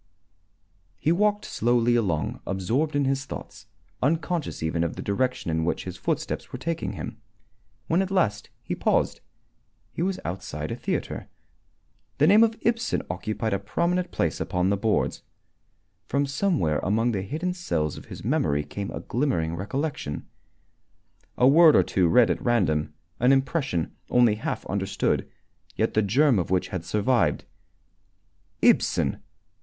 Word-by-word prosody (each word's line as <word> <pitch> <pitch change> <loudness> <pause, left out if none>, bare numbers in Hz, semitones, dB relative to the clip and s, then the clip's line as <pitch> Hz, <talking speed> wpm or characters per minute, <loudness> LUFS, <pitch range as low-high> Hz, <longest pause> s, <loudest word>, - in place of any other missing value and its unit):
He 155 - +1
walked 205 +3 +2
slowly 120 +1 +2
along, 95 -10 0
absorbed 115 - 0
in 145 -1 +2
his 135 +1 0
thoughts, - - -9 0.3
unconscious 165 - -1
even 80 +1 0
of 85 - -2
the - - -6
direction 125 -3 -1
in 80 0 0
which 85 - -1
his - - -6
footsteps - - -3
were - - -5
taking 165 +5 -3
him. 110 - -7 0.6
When 170 +4 +2
at 190 - -2
last 140 - 0
he - - -3
paused, - - +1 0.7
he - - -5
was 190 +1 0
outside 90 +3 -4
a - - -2
theatre. - - -3 0.9
The 145 - +4
name 205 +7 +7
of 225 0 +1
Ibsen 230 +1 0
occupied 110 0 -2
a 100 - 0
prominent 170 - 0
place 80 - -1
upon 90 +2 0
the - - +3
boards. 105 +2 0 0.9
From 140 +2 +1
somewhere 140 - +1
among 110 +5 +1
the 100 -4 -1
hidden 160 - -3
cells 85 - -2
of - - -10
his - - -9
memory 75 0 +1
came 100 +7 -5
a - - -5
glimmering 85 - -1
recollection 105 - -3 1.1
a 125 - +5
word 160 +3 +7
or - - +6
two 90 -2 +1
read 120 +7 +5
at - - -2
random, 90 -11 +1 0.3
an 125 +2 +4
impression, 135 - 0
only 120 -3 +5
half 105 - -4
understood, - - -1 0.5
yet - - 0
the 110 - +3
germ 125 +3 +3
of 90 - -2
which 95 0 +1
had 95 -3 -4
survived. 105 +3 +1 1.2
Ibsen! 70 - +3
120 Hz, 150 wpm, -26 LUFS, 95-155 Hz, 1.2 s, name